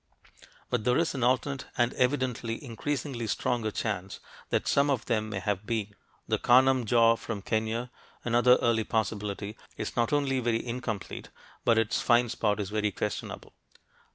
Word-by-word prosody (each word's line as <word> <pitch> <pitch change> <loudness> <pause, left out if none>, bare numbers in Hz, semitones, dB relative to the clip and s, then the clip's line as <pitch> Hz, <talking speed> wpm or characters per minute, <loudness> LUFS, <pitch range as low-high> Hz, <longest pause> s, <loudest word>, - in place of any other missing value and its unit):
But 125 -3 0
there 125 +1 +3
is 165 - +1
an 130 -4 -2
alternate 130 +2 +1
and 120 0 +2
evidently 125 -3 0
increasingly 130 -1 -3
stronger 110 +1 0
chance 100 -3 -3 0.3
that - - 0
some 140 +1 +3
of 130 -4 0
them 110 -3 0
may 110 - -3
have 100 +1 -2
been. 110 -3 -2 0.3
The - - +1
Kanam 130 0 +5
jaw 115 +1 +5
from 110 -3 -6
Kenya, 110 +3 -1 0.3
another 120 +1 +5
early 115 -2 +3
possibility, 105 -1 -2 0.2
is - - -4
not 120 -1 +1
only 140 -3 +1
very 120 -1 0
incomplete 115 -4 -5 0.3
but 115 - +4
its 115 -1 +1
find 120 -1 +3
spot 105 -2 0
is 100 -1 -3
very 105 0 +1
questionable. - - -5
115 Hz, 155 wpm, -29 LUFS, 110-125 Hz, 0.3 s, Kanam